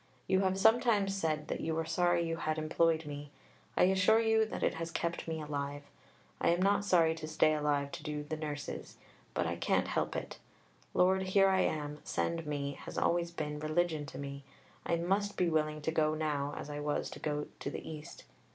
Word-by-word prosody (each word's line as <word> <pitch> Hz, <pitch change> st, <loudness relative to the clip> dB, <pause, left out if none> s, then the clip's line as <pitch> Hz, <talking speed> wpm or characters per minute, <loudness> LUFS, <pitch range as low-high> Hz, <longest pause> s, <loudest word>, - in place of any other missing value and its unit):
You 190 Hz, 0 st, +3 dB
have 190 Hz, 0 st, +1 dB
sometimes 220 Hz, -2 st, +4 dB
said 155 Hz, -5 st, -1 dB
that -, -, -2 dB
you 160 Hz, 0 st, -1 dB
were 165 Hz, 0 st, -1 dB
sorry 175 Hz, +1 st, +2 dB
you 165 Hz, 0 st, -2 dB
had 155 Hz, -1 st, -1 dB
employed 160 Hz, +1 st, +2 dB
me. 145 Hz, 0 st, -6 dB, 0.5 s
I -, -, +6 dB
assure 190 Hz, +4 st, +5 dB
you 220 Hz, -1 st, +3 dB
that -, -, -4 dB
it -, -, +2 dB
has 165 Hz, 0 st, -4 dB
kept 170 Hz, 0 st, -2 dB
me 160 Hz, -1 st, -2 dB
alive. 145 Hz, -1 st, -4 dB, 0.6 s
I -, -, +2 dB
am 195 Hz, +4 st, +3 dB
sorry 175 Hz, -5 st, +4 dB
not 160 Hz, -, -4 dB
to 155 Hz, -, -6 dB
stay 155 Hz, 0 st, +3 dB
alive 145 Hz, -2 st, 0 dB
to -, -, -6 dB
do 150 Hz, -1 st, -4 dB
the 155 Hz, +1 st, -4 dB
"Nurses." 150 Hz, -2 st, -5 dB, 0.4 s
But -, -, +1 dB
I -, -, -2 dB
can't -, -, +1 dB
help -, -, -1 dB
it. -, -, -5 dB, 0.6 s
"Lord, 190 Hz, +1 st, +4 dB
here 195 Hz, +1 st, +4 dB
I 190 Hz, 0 st, +3 dB
am, 150 Hz, -1 st, -1 dB
send 165 Hz, -2 st, -2 dB
me" 140 Hz, -1 st, -3 dB
has -, -, -7 dB
always 170 Hz, 0 st, +2 dB
been 150 Hz, -3 st, -4 dB
religion 155 Hz, -1 st, 0 dB
to 130 Hz, -, -8 dB
me. 140 Hz, 0 st, -6 dB, 0.4 s
I 170 Hz, -, +2 dB
must 195 Hz, +4 st, 0 dB
be 175 Hz, -2 st, +2 dB
willing 155 Hz, -1 st, 0 dB
to 160 Hz, -, 0 dB
go 155 Hz, -1 st, +2 dB
now 145 Hz, -2 st, -1 dB
as -, -, -5 dB
I 145 Hz, 0 st, -5 dB
was 145 Hz, 0 st, -1 dB
to -, -, -8 dB
go 150 Hz, -1 st, -2 dB
to -, -, -3 dB
the -, -, -6 dB
East. 155 Hz, -1 st, -8 dB
160 Hz, 205 wpm, -33 LUFS, 150-180 Hz, 0.6 s, I